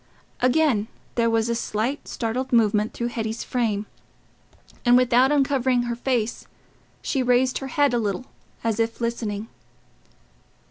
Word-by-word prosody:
Again 250 -4 +3 0.3
there 230 -1 +2
was 225 0 +1
a 235 - 0
slight 235 +4 -2
startled 250 +3 -3
movement 215 -2 +3
through 235 0 -3
Hetty's 225 -1 -3
frame, 215 -4 -1 1.0
and 245 -1 +6
without 250 +2 +4
uncovering 265 -3 +2
her 240 -1 -2
face, 240 -2 -2 0.6
she 270 - 0
raised 250 +1 +2
her 270 - -5
head 285 0 +2
a 240 - +2
little, 210 +2 -2 0.4
as 225 -1 0
if 230 0 -1
listening. 225 -3 -3
235 Hz, 135 wpm, -24 LUFS, 225-255 Hz, 1.0 s, and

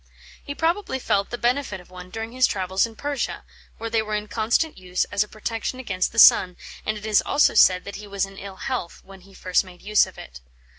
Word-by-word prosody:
He 285 - -6
probably 340 -1 0
felt 200 -6 0
the 240 - -4
benefit 245 -4 -1
of 180 0 -17
one 180 0 -10
during 225 +3 -6
his 255 +1 +3
travels 190 +2 0
in 225 - -14
Persia, 285 +1 -3 0.3
where 230 - -5
they 225 -1 +2
were 215 -1 -3
in 210 0 -3
constant 235 +9 0
use 185 0 -1
as 205 +1 +2
a - - -13
protection 225 +4 -4
against 185 -8 -1
the 230 - -12
sun, 180 -5 +7 0.3
and 215 0 0
it 210 - -9
is 215 -1 +4
also 290 - +3
said 180 0 +5
that 200 - -7
he 210 0 -10
was 200 -1 -1
in 195 0 -12
ill 195 -1 -8
health 240 -4 -5
when 195 -1 -14
he 195 +1 -18
first 185 +1 +1
made 180 -2 -15
use 210 0 +4
of - - -14
it. 60 0 -11
210 Hz, 235 wpm, -23 LUFS, 190-235 Hz, 0.3 s, sun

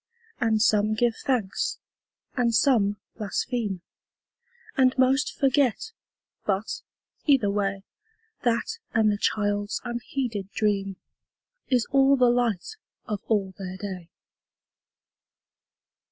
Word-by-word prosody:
And 225 -2 +2 0.4
give 235 -1 +2
some - - -14
thanks, 235 -8 0 0.6
and 235 -3 +2
some 210 -8 +3 0.2
blaspheme, 210 -2 -2 0.9
And 260 -1 +3
most 265 +2 +3
forget, 275 - +2 0.5
but, 200 +1 -1 0.5
either 255 -9 +4
way, 200 -1 -1 0.6
That 240 - 0 0.2
and 220 -1 +4
the 205 - -2
child's 205 -1 0
unheeded 235 -4 -3
dream 200 -2 0 0.7
Is 250 -3 +3
all 275 0 +5
the 250 -1 +5
light 240 - 0 0.3
of 210 -2 -3
all 200 -4 +1
their 185 -1 -5
day. 185 -4 -6
220 Hz, 100 wpm, -26 LUFS, 200-255 Hz, 0.9 s, all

